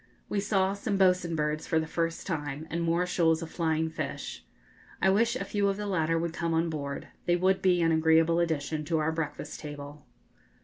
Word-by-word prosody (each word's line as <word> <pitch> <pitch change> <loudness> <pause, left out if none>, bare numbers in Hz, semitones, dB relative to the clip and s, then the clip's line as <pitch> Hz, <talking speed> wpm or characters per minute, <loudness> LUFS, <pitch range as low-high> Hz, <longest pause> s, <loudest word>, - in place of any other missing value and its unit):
We 205 - 0
saw 195 -2 +1
some 200 0 -2
'bo's'n' 180 -3 +3
birds 150 0 -1
for 160 - +2
the 160 - -1
first 165 +1 -2
time, 150 -3 -3
and 170 - -1
more 170 +2 +1
shoals 165 -2 +2
of 165 - -8
flying 160 -1 0
fish. - - -5 0.6
I 190 - +4
wish 230 +5 +2
a - - -3
few 205 -1 0
of 195 0 0
the 210 - -4
latter 165 -4 +1
would 165 0 -2
come 170 -1 -1
on 165 0 +1
board; 140 -2 -5 0.2
they 175 - +4
would 185 +2 +2
be 180 -2 +3
an 165 - +3
agreeable 160 +1 +4
addition 155 -2 -1
to 165 +1 0
our 155 +1 +1
breakfast 160 -2 -4
table. 145 -1 -9
165 Hz, 205 wpm, -29 LUFS, 160-180 Hz, 0.6 s, I